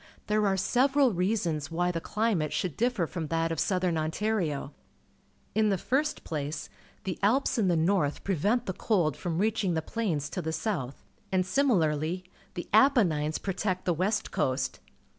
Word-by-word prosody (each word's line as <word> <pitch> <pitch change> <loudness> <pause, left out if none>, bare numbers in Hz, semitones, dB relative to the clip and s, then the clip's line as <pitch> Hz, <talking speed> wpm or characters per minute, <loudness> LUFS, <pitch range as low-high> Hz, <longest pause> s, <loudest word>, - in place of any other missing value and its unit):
There 210 0 +2
are 195 -1 +1
several 265 +4 +3
reasons 175 -5 0
why 175 +2 0
the 165 -1 -3
climate 210 -9 0
should 180 -6 -2
differ 240 -6 +1
from 160 -1 -4
that 165 +1 0
of 165 - -2
Southern 180 -4 +1
Ontario. 160 -4 -1 0.8
In 215 0 +3
the 195 - +2
first 290 - -1
■n 155 -3 -3
inds 150 0 -6 2.5
from 170 -2 -3
reaching 205 -2 +1
the 160 - 0
plains 165 -9 -2
to - - -3
the 160 - -3
south, 160 - -3 0.3
and, 185 -1 +2
similarly, 180 - +1 0.3
the 175 - -5
Apennines 190 - +4
protect 185 -1 -2
the 175 - +2
west 195 +6 -1
coast. 130 0 -1
180 Hz, 135 wpm, -29 LUFS, 160-215 Hz, 2.5 s, Apennines